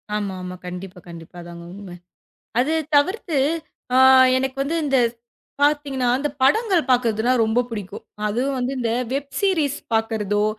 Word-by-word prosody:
ஆமா 200 Hz, -2 st, -3 dB
ஆமா. 180 Hz, 0 st, -6 dB
கண்டிப்பா. 180 Hz, +1 st, -8 dB
கண்டிப்பா. 170 Hz, 0 st, -11 dB
அதாங்க 170 Hz, 0 st, -10 dB
உண்மை. 195 Hz, -3 st, -10 dB, 0.6 s
அதைத் 310 Hz, +3 st, 0 dB
தவிர்த்து 335 Hz, 0 st, +1 dB, 1.0 s
எனக்கு 265 Hz, 0 st, -2 dB
வந்து 300 Hz, +4 st, -2 dB
இந்த 275 Hz, -2 st, +2 dB, 0.6 s
பாத்தீங்கன்னா 285 Hz, -3 st, +1 dB
அந்தப் 285 Hz, +1 st, -3 dB
படங்கள் 380 Hz, -, +3 dB
பாக்குறது 230 Hz, -3 st, +2 dB, 0.2 s
ரொம்ப 220 Hz, +2 st, +1 dB
புடிக்கும். 205 Hz, -5 st, -7 dB, 0.2 s
அது 220 Hz, +4 st, -1 dB, 0.2 s
வந்து 250 Hz, +1 st, -2 dB
இந்த 230 Hz, -2 st, -1 dB, 0.2 s
வெப் 280 Hz, +1 st, -4 dB
சீரிஸ் 320 Hz, -8 st, +1 dB, 0.2 s
பாக்குறதோ, 210 Hz, -2 st, 0 dB
250 Hz, 130 wpm, -22 LUFS, 205-290 Hz, 1.0 s, படங்கள்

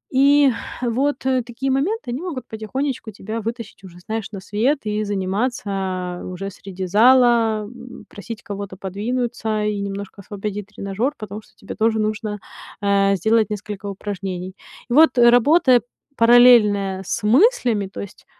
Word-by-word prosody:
И 280 Hz, +1 st, +5 dB, 0.3 s
вот 255 Hz, +4 st, 0 dB
такие 260 Hz, 0 st, -1 dB
моменты, 290 Hz, -, -1 dB
они 250 Hz, +5 st, -4 dB
могут 335 Hz, -8 st, -6 dB
потихонечку 230 Hz, +2 st, -4 dB
тебя 215 Hz, +3 st, -6 dB
вытащить 230 Hz, -2 st, -6 dB
уже, 175 Hz, -2 st, -13 dB
знаешь, 220 Hz, +3 st, -5 dB
на 200 Hz, -, -6 dB
свет 225 Hz, +9 st, 0 dB
и 210 Hz, 0 st, -1 dB
заниматься 195 Hz, -3 st, -2 dB
уже 185 Hz, +2 st, -5 dB
среди 190 Hz, -1 st, -7 dB
зала, 230 Hz, +1 st, +4 dB
м, 245 Hz, +3 st, -12 dB
просить 225 Hz, +2 st, -8 dB
кого-то 200 Hz, -1 st, -6 dB
подвинуться 220 Hz, +2 st, -2 dB
и 210 Hz, -1 st, -1 dB
немножко 200 Hz, 0 st, -6 dB
освободить 205 Hz, 0 st, -6 dB
тренажёр, 205 Hz, +8 st, -2 dB
потому 215 Hz, -1 st, -7 dB
что -, -, -25 dB
тебе 200 Hz, -, -9 dB
тоже 220 Hz, 0 st, +1 dB
нужно, 215 Hz, 0 st, -2 dB, 0.4 s
э, 200 Hz, -1 st, +3 dB
сделать 220 Hz, +3 st, +2 dB
несколько 210 Hz, 0 st, -6 dB
упражнений. 190 Hz, -2 st, -5 dB, 0.3 s
И -, -, -1 dB
вот, 295 Hz, -2 st, +5 dB
работая 245 Hz, +2 st, +5 dB, 0.3 s
параллельно 230 Hz, -6 st, +5 dB
с 230 Hz, -, -2 dB
мыслями, 240 Hz, -, +3 dB
то 190 Hz, -, -8 dB
есть 200 Hz, -, -11 dB
215 Hz, 140 wpm, -21 LUFS, 200-245 Hz, 0.4 s, И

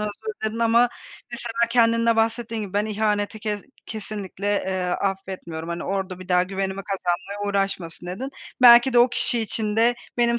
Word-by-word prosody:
Özür 210 Hz, 0 st, -1 dB, 0.3 s
diledin 220 Hz, +1 st, -2 dB
ama, 235 Hz, +1 st, +4 dB, 0.4 s
mesela, 235 Hz, -1 st, -1 dB
kendinde 230 Hz, -1 st, +3 dB
bahsettiğin 225 Hz, 0 st, 0 dB
gibi, 200 Hz, -3 st, -7 dB
ben 205 Hz, +1 st, +1 dB
ihaneti 210 Hz, 0 st, -1 dB
ke 210 Hz, -1 st, -2 dB, 0.3 s
kesinlikle, 205 Hz, -2 st, -6 dB, 0.2 s
eee, 190 Hz, -1 st, -1 dB
affetmiyorum. 180 Hz, -3 st, -3 dB
Hani, 170 Hz, 0 st, -4 dB
orada 190 Hz, -2 st, -3 dB
bir 185 Hz, -, -10 dB
daha 180 Hz, 0 st, +4 dB
güvenimi 195 Hz, +1 st, -3 dB
kazanmaya 195 Hz, +1 st, -2 dB
uğraşmasın, 195 Hz, -4 st, -2 dB
dedin. 235 Hz, +10 st, -5 dB, 0.3 s
Belki 240 Hz, +1 st, +8 dB
de 240 Hz, -, +5 dB
o 240 Hz, +1 st, +6 dB
kişi 240 Hz, 0 st, +1 dB
için 215 Hz, -1 st, -2 dB
de: 235 Hz, +2 st, +4 dB, 0.2 s
"Benim 235 Hz, 0 st, +3 dB
210 Hz, 160 wpm, -23 LUFS, 190-230 Hz, 0.4 s, Belki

